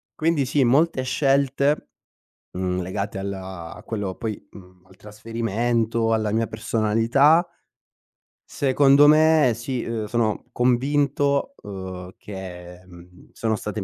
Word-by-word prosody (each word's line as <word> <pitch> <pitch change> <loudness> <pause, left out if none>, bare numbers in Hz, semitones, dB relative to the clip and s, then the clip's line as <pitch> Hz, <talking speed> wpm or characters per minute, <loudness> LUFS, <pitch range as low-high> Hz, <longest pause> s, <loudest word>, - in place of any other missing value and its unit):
Quindi 155 -4 +1
sì, 145 0 +2
molte 135 +3 +2
scelte, 140 +2 +1 0.7
mhmm, 90 -1 -1
legate 100 +2 -4
al 100 +1 -4
a 95 -3 -8
quello 105 -4 -4
poi 110 -3 -4
mhmm, 90 -1 -16
al 95 - -19
trasferimento, 115 +2 -2
alla 110 -2 0
mia 115 +1 0
personalità 115 - +2 1.0
secondo 140 +1 +4
me 155 -3 +5
sì, 120 +2 -4
uhm, 115 -2 -3
sono 115 -1 -1
convinto, 140 - +1
uhm, 95 -2 -8
che, 90 -3 -9
mhmm, 90 0 -17
sono 110 -1 -1
state 105 0 -5
115 Hz, 115 wpm, -23 LUFS, 95-135 Hz, 1.0 s, me